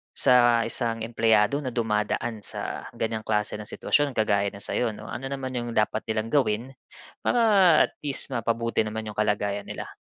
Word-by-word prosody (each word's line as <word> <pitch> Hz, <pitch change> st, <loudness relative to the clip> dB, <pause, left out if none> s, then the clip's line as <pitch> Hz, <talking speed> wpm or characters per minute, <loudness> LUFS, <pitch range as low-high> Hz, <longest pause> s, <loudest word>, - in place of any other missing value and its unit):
sa 120 Hz, -3 st, +4 dB
isang 115 Hz, -1 st, -1 dB
empleyado 115 Hz, +3 st, +2 dB
na 130 Hz, -4 st, -4 dB
dumadaan 110 Hz, 0 st, -1 dB
sa 105 Hz, -, -6 dB
ganyang 110 Hz, -1 st, -2 dB
klase 105 Hz, -1 st, 0 dB
ng 105 Hz, -, -8 dB
sitwasyon, 145 Hz, +2 st, 0 dB
kagaya 100 Hz, -2 st, +2 dB
ng 100 Hz, 0 st, -6 dB
sa’yo, 115 Hz, -3 st, -1 dB
‘no? -, -, -9 dB
Ano 135 Hz, -, -5 dB
naman 135 Hz, -1 st, -4 dB
’yong 120 Hz, -2 st, -4 dB
dapat 110 Hz, +1 st, 0 dB
nilang 110 Hz, +1 st, -2 dB
gawin 125 Hz, -2 st, +1 dB, 0.5 s
para, 245 Hz, -, +2 dB, 0.5 s
at -, -, -22 dB
least, 145 Hz, -2 st, -2 dB
mapabuti 115 Hz, 0 st, 0 dB
naman 110 Hz, +1 st, -5 dB
’yong 105 Hz, -, -6 dB
kalagayan 105 Hz, -1 st, 0 dB
nila? -, -, -5 dB
115 Hz, 170 wpm, -26 LUFS, 105-120 Hz, 0.5 s, sa